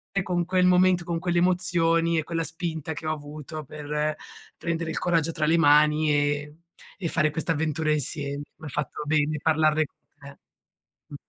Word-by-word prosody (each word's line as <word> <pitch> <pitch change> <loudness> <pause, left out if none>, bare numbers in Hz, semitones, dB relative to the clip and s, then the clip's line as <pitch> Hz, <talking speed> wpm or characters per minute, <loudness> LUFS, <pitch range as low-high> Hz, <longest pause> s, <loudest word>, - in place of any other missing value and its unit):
E 195 - +2
con 175 -1 -1
quel 180 +1 +2
momento, 180 0 +4
con 170 -1 -2
quelle 175 0 0
emozioni 170 -2 +2
e - - -2
quella 165 +1 -2
spinta 160 -1 -4
che 155 +1 -6
ho 155 - +1
avuto 150 +1 -7
per 150 +1 -3 0.4
prendere 165 -1 -2
il - - -3
coraggio 165 -2 +1
tra 160 -1 -1
le 165 +2 +4
mani 150 0 +4
e 145 +1 -1 0.4
e 185 - -3
fare 155 -1 +1
questa 160 +2 -2
avventura 155 0 -1
insieme. 145 -1 -2
Mi - - -12
ha - - -6
fatto 145 +2 -4
bene 150 0 +1
parlarne 155 0 +3
con - - -22 0.2
te. 140 -1 -12 0.7
Mh. - - -10
155 Hz, 180 wpm, -26 LUFS, 150-170 Hz, 0.7 s, momento